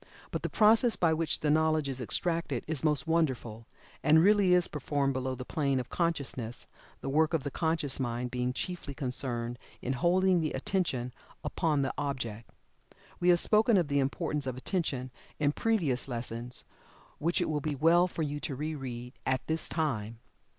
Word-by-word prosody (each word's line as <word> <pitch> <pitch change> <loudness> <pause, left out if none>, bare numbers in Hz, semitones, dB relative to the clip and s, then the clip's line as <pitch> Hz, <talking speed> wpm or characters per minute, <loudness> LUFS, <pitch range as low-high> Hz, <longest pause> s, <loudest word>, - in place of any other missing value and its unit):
But - - -2
the - - -2
process 225 +2 +5
by 165 -2 +3
which 160 -1 -1
the 150 - +2
knowledge 155 -1 +2
is 130 -1 -2
extracted 165 0 -1
is 155 -4 -2
most 150 -4 +2
wonderful, 130 -9 -1 0.3
and 155 +1 +6
really 200 -2 +5
is 180 -1 +4
performed 145 -2 -1
below 130 0 -2
the 125 - -7
plane 140 -3 0
of 125 - -5
consciousness, 140 -8 -1 0.4
the - - -5
work 155 +3 +3
of 150 - -1
the 140 - -3
conscious 160 -4 0
mind 120 -1 -2
being 125 0 -1
chiefly 145 0 -4
concerned 125 -3 -3 0.2
in 130 - -2
holding 180 +5 +3
the 155 - -1
Attention 130 -10 -1 0.3
upon 150 -5 0
the 135 - -1
object. 120 -6 -4 0.7
We 180 - +3
have 175 -1 +6
spoken 215 +2 +4
of 170 -5 +1
the 140 0 +2
importance 145 +1 -1
of 130 -1 -3
Attention 130 -5 -2 0.3
in 145 -1 +2
previous 160 - 0
lessons, 120 0 -5 0.5
which 170 +3 +1
it - - 0
will 150 -2 -1
be 150 0 -2
well 165 +5 +5
for 165 -2 -3
you 145 0 -3
to 140 - -3
re 155 +4 -3
read, 125 -3 -6
at 130 0 0
this 160 0 -2
time. 115 -9 -2
145 Hz, 180 wpm, -30 LUFS, 130-165 Hz, 0.7 s, and